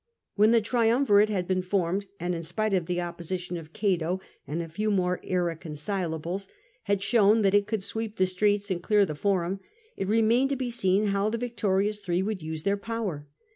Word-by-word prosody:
When 210 Hz, +1 st, +4 dB
the 230 Hz, 0 st, +5 dB
triumvirate 225 Hz, -1 st, +3 dB
had 185 Hz, -4 st, -1 dB
been 185 Hz, -1 st, +1 dB
formed, 185 Hz, +1 st, -1 dB
and 175 Hz, +1 st, -1 dB
(in 165 Hz, -, -3 dB
spite 215 Hz, +5 st, -1 dB
of 180 Hz, -3 st, +1 dB
the 175 Hz, -1 st, -1 dB
opposition 175 Hz, +1 st, -4 dB
of 160 Hz, -2 st, -8 dB
Cato 185 Hz, -4 st, 0 dB, 0.3 s
and 150 Hz, +5 st, -3 dB
a 170 Hz, -, -3 dB
few 210 Hz, +7 st, -2 dB
more 180 Hz, -3 st, +1 dB
irreconcilables) 170 Hz, +1 st, -3 dB, 0.4 s
had 200 Hz, -1 st, 0 dB
shown 215 Hz, 0 st, +4 dB
that 195 Hz, -1 st, +3 dB
it 205 Hz, 0 st, +3 dB
could 215 Hz, -3 st, -2 dB
sweep 220 Hz, +1 st, -3 dB
the 185 Hz, -, +3 dB
streets 205 Hz, +2 st, +1 dB
and 175 Hz, -2 st, -1 dB
clear 205 Hz, +2 st, +3 dB
the 155 Hz, -, -4 dB
Forum, 190 Hz, +2 st, 0 dB, 0.4 s
it 195 Hz, -, -3 dB
remained 225 Hz, +5 st, +3 dB
to 280 Hz, -, 0 dB
be 255 Hz, -2 st, -3 dB
seen 205 Hz, -2 st, +2 dB
how 200 Hz, +1 st, +1 dB
the 230 Hz, -, -2 dB
victorious 210 Hz, -4 st, 0 dB
three 185 Hz, -2 st, -1 dB
would 205 Hz, -2 st, -3 dB
use 155 Hz, 0 st, -5 dB
their 200 Hz, 0 st, +1 dB
power. 200 Hz, -9 st, -4 dB
195 Hz, 195 wpm, -27 LUFS, 175-215 Hz, 0.4 s, the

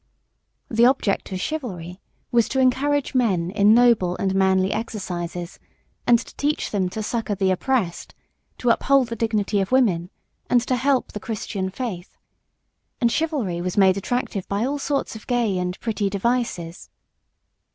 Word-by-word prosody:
The 235 Hz, +1 st, +4 dB
object 250 Hz, -8 st, 0 dB
of 185 Hz, -, -3 dB
chivalry 185 Hz, -, -5 dB, 0.3 s
was 235 Hz, -3 st, +3 dB
to 265 Hz, -, 0 dB
encourage 275 Hz, +2 st, +2 dB
men 190 Hz, -9 st, +1 dB
in 205 Hz, +1 st, +5 dB
noble 230 Hz, -7 st, +4 dB
and 190 Hz, -1 st, 0 dB
manly 190 Hz, 0 st, +2 dB
exercises, 180 Hz, -5 st, -5 dB, 0.5 s
and 240 Hz, -, +7 dB
to 240 Hz, -, -10 dB
teach 295 Hz, +1 st, -1 dB
them 190 Hz, -3 st, 0 dB
to 215 Hz, +4 st, -5 dB
succour 220 Hz, -2 st, -2 dB
the 190 Hz, -1 st, +1 dB
oppressed, 190 Hz, -2 st, -1 dB, 0.4 s
to 245 Hz, -, +2 dB
uphold 270 Hz, 0 st, +3 dB
the 230 Hz, -, -3 dB
dignity 215 Hz, -3 st, 0 dB
of 190 Hz, -, -3 dB
women, 190 Hz, -10 st, +2 dB, 0.4 s
and 245 Hz, -, +5 dB
to 255 Hz, -, +1 dB
help 265 Hz, +1 st, +1 dB
the 210 Hz, -, -6 dB
Christian 200 Hz, -3 st, -4 dB
faith. 190 Hz, -4 st, -6 dB, 0.8 s
And 235 Hz, -2 st, +2 dB
chivalry 270 Hz, -, -1 dB
was 180 Hz, +2 st, -3 dB
made 190 Hz, -2 st, +5 dB
attractive 200 Hz, -1 st, -2 dB
by 200 Hz, +3 st, -1 dB
all 285 Hz, +2 st, -2 dB
sorts 275 Hz, -4 st, -2 dB
of 220 Hz, -, -11 dB
gay 235 Hz, -7 st, +1 dB
and 180 Hz, +1 st, -3 dB
pretty 215 Hz, -3 st, -1 dB
devices. 200 Hz, -5 st, -2 dB
215 Hz, 155 wpm, -23 LUFS, 190-245 Hz, 0.8 s, and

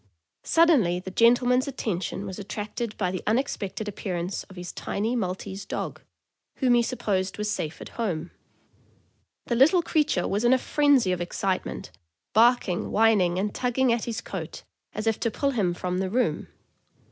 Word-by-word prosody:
Suddenly 275 Hz, -, +4 dB
the 190 Hz, +1 st, -8 dB
gentleman's 245 Hz, +4 st, +4 dB
attention 200 Hz, -7 st, -3 dB
was 190 Hz, 0 st, -6 dB
attracted 210 Hz, +2 st, -5 dB
by 180 Hz, -3 st, 0 dB
the 185 Hz, -, -4 dB
unexpected 215 Hz, -4 st, -1 dB
appearance 185 Hz, -2 st, -3 dB
of 190 Hz, -, -15 dB
his 180 Hz, -1 st, -6 dB
tiny 220 Hz, +5 st, -2 dB
Maltese 190 Hz, -2 st, -3 dB
dog, -, -, -5 dB, 0.5 s
whom 255 Hz, -3 st, +2 dB
he 240 Hz, -, +5 dB
supposed 195 Hz, -6 st, -1 dB
was 210 Hz, 0 st, -1 dB
safe 155 Hz, -5 st, -3 dB
at -, -, -8 dB
home. 175 Hz, -8 st, -3 dB, 1.1 s
The -, -, -1 dB
little 315 Hz, +9 st, +5 dB
creature 300 Hz, -, +1 dB
was 205 Hz, +3 st, -1 dB
in 240 Hz, +1 st, +5 dB
a -, -, +5 dB
frenzy 280 Hz, -6 st, +3 dB
of 180 Hz, -1 st, -1 dB
excitement, 175 Hz, -, -3 dB, 0.4 s
barking, 225 Hz, -5 st, +3 dB
whining, 205 Hz, -5 st, +3 dB
and 205 Hz, +2 st, -1 dB
tugging 250 Hz, 0 st, +1 dB
at 235 Hz, -, -1 dB
his 225 Hz, -6 st, -3 dB
coat 170 Hz, -5 st, -7 dB, 0.3 s
as 215 Hz, +2 st, -5 dB
if 225 Hz, -1 st, +1 dB
to 230 Hz, -, 0 dB
pull 275 Hz, +5 st, 0 dB
him 205 Hz, -9 st, +1 dB
from 180 Hz, +1 st, -3 dB
the 190 Hz, -1 st, -1 dB
room. 245 Hz, +5 st, 0 dB
210 Hz, 160 wpm, -26 LUFS, 185-245 Hz, 1.1 s, he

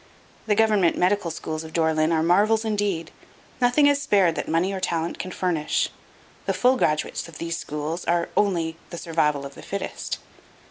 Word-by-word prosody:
The 210 Hz, -, +3 dB
government 210 Hz, -5 st, +3 dB
medical 185 Hz, 0 st, +2 dB
schools 160 Hz, -1 st, -5 dB
of 160 Hz, 0 st, -10 dB
Dore 160 Hz, -1 st, +2 dB
lyn 155 Hz, +1 st, +2 dB
are 160 Hz, -1 st, +2 dB
marvels 210 Hz, +6 st, +3 dB
indeed. 205 Hz, -6 st, -1 dB, 0.5 s
Nothing 245 Hz, +4 st, +4 dB
is 285 Hz, 0 st, +4 dB
spared 195 Hz, -9 st, +3 dB
that -, -, -4 dB
money 170 Hz, +5 st, +1 dB
or 190 Hz, -, -3 dB
talent 170 Hz, -2 st, -2 dB
can 185 Hz, -, -4 dB
furnish. 175 Hz, -4 st, 0 dB, 0.6 s
The -, -, +1 dB
full 255 Hz, +1 st, +4 dB
graduates 155 Hz, -10 st, 0 dB
of 170 Hz, -, -11 dB
these 170 Hz, 0 st, -3 dB
schools 150 Hz, +3 st, -4 dB
are 170 Hz, 0 st, +1 dB
only 170 Hz, -5 st, +1 dB
"the 170 Hz, -, -7 dB
survival 150 Hz, -4 st, 0 dB
of 140 Hz, -, -8 dB
the -, -, -12 dB
fittest." 200 Hz, -, -4 dB
170 Hz, 180 wpm, -24 LUFS, 160-205 Hz, 0.6 s, Nothing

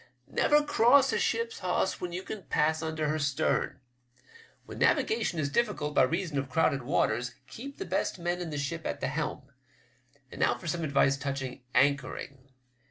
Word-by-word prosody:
" -, -, -43 dB
Never 295 Hz, 0 st, +3 dB
cross 275 Hz, -1 st, +5 dB
a -, -, +1 dB
ship's 460 Hz, 0 st, -1 dB
hawse -, -, 0 dB
when 180 Hz, -, -3 dB
you 180 Hz, +2 st, -4 dB
can 215 Hz, -, -6 dB
pass 155 Hz, +1 st, +1 dB
under 160 Hz, -1 st, -2 dB
her 155 Hz, +1 st, 0 dB
stern. 140 Hz, -1 st, 0 dB, 0.9 s
When -, -, -9 dB
navigation 440 Hz, -, +2 dB
is 140 Hz, -2 st, -1 dB
diflScult 205 Hz, -8 st, 0 dB
by -, -, +5 dB
reason 160 Hz, +2 st, 0 dB
of 135 Hz, -1 st, -4 dB
crowded 140 Hz, -1 st, +2 dB
waters, 125 Hz, -1 st, 0 dB
keep 275 Hz, -, -9 dB
the -, -, -5 dB
best 185 Hz, +2 st, -1 dB
men 175 Hz, 0 st, -2 dB
in 175 Hz, -, -4 dB
the 150 Hz, -, -4 dB
ship 160 Hz, +3 st, -3 dB
at -, -, -3 dB
the 130 Hz, -, -1 dB
helm. 150 Hz, -1 st, -3 dB, 0.9 s
And -, -, -7 dB
now 120 Hz, -, +3 dB
for 120 Hz, -, -13 dB
some 170 Hz, +1 st, -2 dB
advice 140 Hz, -2 st, +3 dB
touching 135 Hz, -2 st, -4 dB
anchoring. 135 Hz, -1 st, 0 dB
155 Hz, 180 wpm, -29 LUFS, 140-180 Hz, 0.9 s, cross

